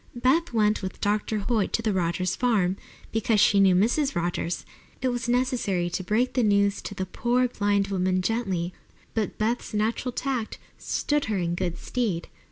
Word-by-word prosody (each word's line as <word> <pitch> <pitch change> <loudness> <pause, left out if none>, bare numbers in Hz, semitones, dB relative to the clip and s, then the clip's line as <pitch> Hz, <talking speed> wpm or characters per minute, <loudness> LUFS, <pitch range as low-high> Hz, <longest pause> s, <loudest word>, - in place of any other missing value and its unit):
Beth 270 +8 +2
went 215 -2 +2
with 190 -1 -5
Dr. 210 +1 0
Hoyt 225 -5 +1
to 230 - 0
the 215 -2 +1
Rogers 180 0 0
farm, 205 -7 +2 0.4
because 225 -1 +2
she 205 -1 +5
knew 190 -2 +5
Mrs. 245 +9 +2
Rogers. 175 0 -2 0.3
It 255 - 0
was 240 -1 -2
necessary 240 -8 0
to 185 - -2
break 220 +7 +1
the 255 - +2
news 200 -2 +2
to 205 - -7
the 190 - -2
poor, 245 +6 +1
blind 205 -3 0
woman 185 -1 +1
gently, 185 -6 -1 0.4
but 220 -3 -2
Beth's 225 +1 -1
natural 225 +4 0
tact 250 -3 -3 0.2
stood 295 -1 0
her 215 -2 -1
in 170 -2 -1
good 175 -1 -2
stead. 215 -9 -2
210 Hz, 175 wpm, -26 LUFS, 185-240 Hz, 0.4 s, she